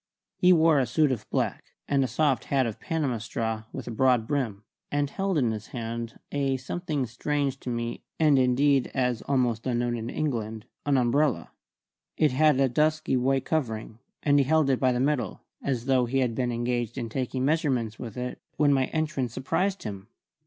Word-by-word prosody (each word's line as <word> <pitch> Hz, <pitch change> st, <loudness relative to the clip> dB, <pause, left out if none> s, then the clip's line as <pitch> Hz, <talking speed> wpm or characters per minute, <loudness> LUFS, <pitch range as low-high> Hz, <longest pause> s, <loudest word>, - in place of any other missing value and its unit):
He 180 Hz, -, +5 dB
wore 160 Hz, -3 st, +5 dB
a 130 Hz, -, +1 dB
suit 155 Hz, -3 st, +2 dB
of 115 Hz, -4 st, -4 dB
black, -, -, -2 dB
and 140 Hz, -1 st, +2 dB
a -, -, 0 dB
soft 135 Hz, +2 st, +1 dB
hat 135 Hz, -2 st, +2 dB
of 115 Hz, -3 st, -4 dB
Panama 145 Hz, -8 st, -1 dB
straw 110 Hz, 0 st, -3 dB
with -, -, -6 dB
a -, -, -3 dB
broad 125 Hz, -1 st, +3 dB
brim, 115 Hz, -8 st, -2 dB, 0.3 s
and 145 Hz, 0 st, +1 dB
held 195 Hz, -3 st, -1 dB
in 120 Hz, -6 st, +2 dB
his 110 Hz, -1 st, -5 dB
hand 115 Hz, -1 st, -5 dB
a 135 Hz, -2 st, 0 dB
something 150 Hz, +1 st, -3 dB
strange 135 Hz, +3 st, -2 dB
to -, -, -6 dB
me, 120 Hz, -1 st, -3 dB, 0.2 s
and, 150 Hz, -4 st, +5 dB
indeed, 130 Hz, +1 st, +3 dB
as 125 Hz, -3 st, +1 dB
yet -, -, -13 dB
almost 125 Hz, -4 st, +1 dB
unknown 120 Hz, -1 st, 0 dB
in 115 Hz, 0 st, -4 dB
England 110 Hz, -7 st, -3 dB, 0.2 s
an 140 Hz, -2 st, +4 dB
umbrella. 130 Hz, +3 st, +1 dB, 0.7 s
It 155 Hz, -, +3 dB
had 150 Hz, +1 st, +4 dB
a 135 Hz, -, +4 dB
dusky 155 Hz, +2 st, +1 dB
white 130 Hz, +1 st, +1 dB
covering, 115 Hz, -7 st, -2 dB, 0.2 s
and 145 Hz, -1 st, +4 dB
he 140 Hz, -, +3 dB
held 155 Hz, -1 st, +3 dB
it 130 Hz, -, +1 dB
by 130 Hz, -1 st, +3 dB
the 125 Hz, -, 0 dB
middle, 130 Hz, -6 st, 0 dB, 0.2 s
as 125 Hz, -4 st, -2 dB
though 130 Hz, -2 st, +3 dB
he 135 Hz, +3 st, -1 dB
had 125 Hz, -3 st, +1 dB
been 125 Hz, +1 st, -1 dB
engaged 120 Hz, 0 st, -2 dB
in 120 Hz, -3 st, -2 dB
taking 130 Hz, +2 st, -2 dB
measurements 135 Hz, -8 st, 0 dB
with 115 Hz, -2 st, -7 dB
it 125 Hz, 0 st, -4 dB, 0.2 s
when 145 Hz, -1 st, +4 dB
my 135 Hz, -1 st, +3 dB
entrance 145 Hz, -7 st, -2 dB
surprised 185 Hz, +10 st, -1 dB
him. 100 Hz, -2 st, -6 dB
130 Hz, 195 wpm, -27 LUFS, 120-145 Hz, 0.7 s, He